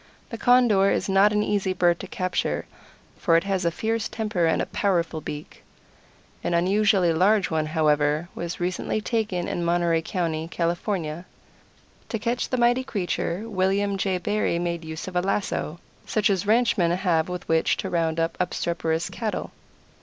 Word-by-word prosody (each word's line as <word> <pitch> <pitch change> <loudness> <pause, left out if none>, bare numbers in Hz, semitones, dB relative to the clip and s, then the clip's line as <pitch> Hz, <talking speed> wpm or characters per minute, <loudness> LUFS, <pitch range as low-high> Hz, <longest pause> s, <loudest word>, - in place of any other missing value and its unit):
The 230 - -4
Condor 240 -6 +4
is - - 0
not 195 +1 +4
an 210 0 +1
easy 200 -3 0
bird 175 -2 +2
to 195 - -7
capture, 185 0 -2 0.5
for 165 -1 +4
it 170 - +1
has 195 -2 -1
a - - +4
fierce 220 +5 -2
temper 210 -7 0
and 160 - +2
a - - 0
powerful 170 -5 0
beak. 150 0 -8 0.8
An 170 - 0
unusually 190 0 +3
large 195 +4 +3
one, 155 -1 0
however, 155 0 +1
was 170 0 -5
recently 180 +4 -1
taken 215 -5 -1
in 175 - -2
Monterey 170 -1 +2
County, 165 -3 -2
California. 170 -1 -2 0.8
To 225 - -1
catch 235 +3 -2
the 255 - 0
mighty 245 +1 +3
creature 195 -2 -2
William 200 0 +1
J. 190 -1 0
Barry 205 -1 0
made 170 -1 -2
use 160 +2 -6
of 185 - -7
a 180 - +3
lasso, 190 -4 -2 0.3
such 210 -1 +2
as 195 0 -1
ranchmen 220 -6 +3
have 175 -2 +1
with 180 0 -5
which 160 0 +2
to - - -3
round 165 -1 0
up 165 0 0
obstreperous 170 -2 -1
cattle. 220 -3 -4
180 Hz, 165 wpm, -25 LUFS, 170-205 Hz, 0.8 s, Condor